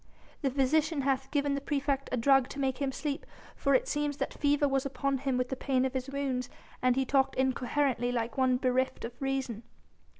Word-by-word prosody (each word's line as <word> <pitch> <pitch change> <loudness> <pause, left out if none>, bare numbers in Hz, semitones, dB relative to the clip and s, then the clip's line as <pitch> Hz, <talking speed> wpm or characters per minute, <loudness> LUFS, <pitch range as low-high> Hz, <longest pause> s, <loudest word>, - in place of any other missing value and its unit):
"The 275 - +1
physician 285 +3 +2
hath 270 0 0
given 285 -1 +1
the 280 - -2
praefect 280 -1 -1
a 255 - 0
drug 270 +1 +4
to 280 - -7
make 265 -1 0
him 275 -2 0
sleep, 290 +2 -3 0.3
for 275 -1 +2
it - - +2
seems 295 -1 -1
that - - -2
fever 290 0 +2
was 270 -1 +1
upon 275 -1 -1
him 265 -1 0
with 250 0 -1
the 265 - -2
pain 260 -1 +1
of 260 - -2
his 260 0 -3
wounds 265 -3 -2 0.3
and 255 -1 +3
he 265 0 +1
talked 270 0 +2
incoherently 260 -1 +1
like 235 -1 -2
one 260 -1 +3
bereft 255 -1 0
of 230 - -6
reason." 270 -5 -2
270 Hz, 205 wpm, -30 LUFS, 255-280 Hz, 0.3 s, drug